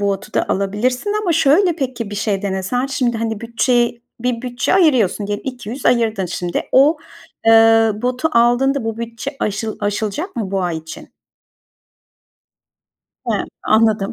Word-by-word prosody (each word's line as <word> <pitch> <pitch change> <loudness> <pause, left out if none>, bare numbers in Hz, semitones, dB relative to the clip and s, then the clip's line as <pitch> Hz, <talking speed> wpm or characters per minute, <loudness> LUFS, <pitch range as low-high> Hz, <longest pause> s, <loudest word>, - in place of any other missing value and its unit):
botu 200 +1 -2
da - - 0
alabilirsin 235 - -1
ama 350 -4 +1
şöyle, 325 +3 +3
peki, 250 -7 -4
bir - - -5
şey 205 -1 -1
denesen? 200 +7 -1
Şimdi, 250 -3 -1
hani, 225 -2 -3
bütçey 235 +1 0 0.2
bir 245 -1 -2
bütçe 250 +6 -1
ayırıyorsun, 255 - +3
ge 205 - -1
200 250 +2 -6
ayırdın 225 -5 +2
şimdi. 175 0 -3
O, 290 +5 +5 0.5
eee, 225 0 +6
botu 250 +5 0
aldığında 245 +2 +3
bu 225 0 -3
bütçe 235 +4 -6
aşıl 215 +1 -2
aşılacak 215 - -3
mı 210 -5 -3
bu 195 -1 -1
ay 175 -2 -1
için? 160 0 -11 2.2
He - - +2 0.3
anladım, 215 -2 +2
230 Hz, 140 wpm, -18 LUFS, 205-255 Hz, 2.2 s, eee